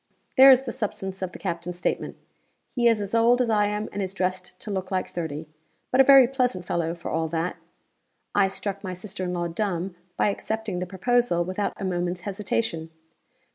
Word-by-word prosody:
There 270 0 +9
is 260 0 +7
the 245 - -4
substance 190 -3 -4
of 185 -1 -3
the - - -9
captain's 170 +1 -4
statement. 180 - -2 0.5
He 240 -2 +2
is 230 -2 +4
as 205 0 -4
old 235 +2 +4
as 240 -3 +2
I 210 -1 +3
am 210 +1 -2
and 200 - -3
is 190 0 -4
dressed 185 0 -2
to 210 - -5
look 190 -1 -3
like 185 -1 -2
thirty; 160 -2 -4 0.4
but 255 - +6
a - - +8
very 270 -2 +8
pleasant 250 -8 -1
fellow 170 -1 -1
for 170 - -6
all 160 0 0
that. 165 +2 -2 0.8
I 200 -1 +4
struck 200 +1 -4
my 185 -2 -4
sister 190 +1 -5
in 180 - -2
law 175 -1 -1
dumb 180 0 -2 0.2
by - - +3
accepting 220 -2 -3
the 180 - -3
proposal 190 -1 +1
without 185 +3 -3
a 195 - -3
moment's 180 -1 -2
hesitation. 195 -4 -2
190 Hz, 200 wpm, -25 LUFS, 180-220 Hz, 0.8 s, There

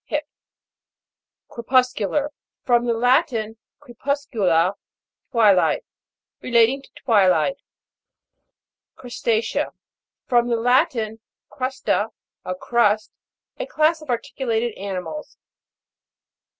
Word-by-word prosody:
Hip. 300 0 -2 1.2
CREPUS'CULAR. 255 +3 +1 0.3
From 240 -1 +2
the 235 - +2
Latin, 235 -3 +1 0.2
cre - - -15
puscula, 220 - +1 0.6
twilight. 215 -7 +3 0.6
Relating 240 +2 +3
to - - -19
twilight. 200 - +3 1.4
CRUSTA'CEA. 235 -2 -1 0.6
From 240 -1 +2
the 240 - +1
Latin, 230 -2 +1 0.3
crvsta, 255 -4 -1 0.3
a 185 - -4
crust. 215 +1 +1 0.5
A - - -3
class 315 -8 +2
of 305 - -13
articulated 235 -1 -1
animals. 200 +10 -6
235 Hz, 85 wpm, -22 LUFS, 215-265 Hz, 1.4 s, twilight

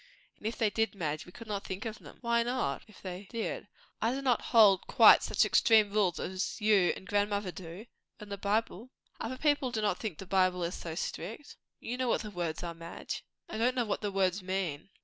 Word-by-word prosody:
And 210 - -4
if 225 - -3
they 220 -3 +2
did, 225 0 0
Madge, 155 -4 -3
we - - -11
could 230 - -11
not 205 -2 -3
think 190 +4 -5
of 220 -1 -5
them." - - -13
"Why 235 -1 +2
not? 240 - -1
if 215 - -17
they 185 +1 -6
did. 230 -1 -4 0.3
I 225 - +2
do 265 - -2
not 250 -4 +2
hold 205 -5 +5
quite - - +8
such - - +2
extreme 215 -3 +5
rules 200 -5 +2
as 185 +3 -3
you 210 -4 +4
and - - -11
grandmother 205 -1 0
do." 175 +4 -9 0.3
"And 210 -2 -10
the 200 - -3
Bible." 215 +2 -1 0.3
"Other 255 +3 -4
people 290 -2 +2
do 235 -3 -2
not 205 -4 0
think 210 -9 -4
the 195 - -8
Bible 185 -1 +2
is 170 +1 -2
so 165 -2 -6
strict." 225 - -5 0.2
"You 245 +2 -4
know 255 -1 0
what - - +1
the 210 - -7
words 170 -4 -3
are, 170 -1 -4
Madge." 165 0 -7 0.2
"I 220 - -5
don't 250 +3 +2
know 245 -2 +1
what 210 - -2
the 205 -2 -2
words 190 0 +1
mean." 185 -4 -3
205 Hz, 225 wpm, -31 LUFS, 185-225 Hz, 0.3 s, quite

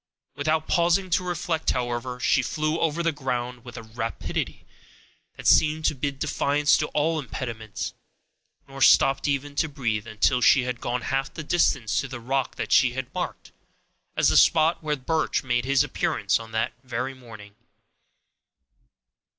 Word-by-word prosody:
Without 155 +2 0
pausing 175 +2 +2
to 180 +2 +2
reflect, 175 -2 -2
however, 125 0 -2
she 125 - +3
flew 155 +5 -1
over 165 +1 0
the 165 - +2
ground 125 -4 -4
with 120 - -10
a - - -7
rapidity 115 +1 -4 0.7
that - - -10
seemed 155 +1 +4
to - - +3
bid 140 0 -3
defiance 145 0 +2
to 150 - 0
all 155 +2 0
impediments, 115 -5 -5 0.7
nor 135 0 -10
stopped 135 +3 +5
even 140 0 -1
to 160 - 0
breathe, 115 -6 -2
until 110 +3 +1
she 125 +1 +5
had 125 -1 -4
gone 125 +1 -2
half 135 +1 -1
the 160 - -7
distance 135 -8 +1
to 135 - -6
the 125 -2 -7
rock 130 +2 -2
that - - -5
she 125 -2 +5
had 130 -1 -5
marked - - -5 0.7
as - - +4
the - - +3
spot 160 +1 +4
where 150 -1 -1
Birch 155 +4 -1
made 120 -1 0
his 135 0 +3
appearance - - 0
on 115 0 -10
that 110 0 -1
very 125 +1 -3
morning. 110 -5 -13
135 Hz, 160 wpm, -25 LUFS, 120-155 Hz, 0.7 s, stopped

